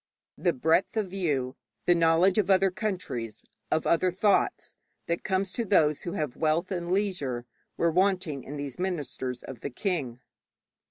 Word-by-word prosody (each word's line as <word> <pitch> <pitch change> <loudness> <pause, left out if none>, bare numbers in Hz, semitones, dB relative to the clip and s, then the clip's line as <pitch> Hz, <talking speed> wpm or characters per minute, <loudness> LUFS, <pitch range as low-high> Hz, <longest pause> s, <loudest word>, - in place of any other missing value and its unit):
The 175 - +3
breadth 160 - +2
of 200 -4 -1
view, 145 -9 -1 0.3
the 175 - +6
knowledge 170 +4 +4
of 200 -2 +1
other 190 0 +4
countries, 180 - -4 0.2
of 160 - +1
other 180 +2 +3
thoughts, 200 +3 +1 0.3
that 170 0 -2
comes 190 -1 0
to 235 - -2
those 155 -8 +3
who 175 - -4
have 150 -9 -2
wealth 160 +4 +1
and 175 -2 -2
leisure, 175 -12 -1 0.3
were 170 - +2
wanting 180 -5 +1
to 145 - -6
these 140 -1 -6
ministers 145 -8 -3
of 130 -4 -8
the 140 - -4
king. 135 - -2
170 Hz, 160 wpm, -28 LUFS, 145-190 Hz, 0.3 s, the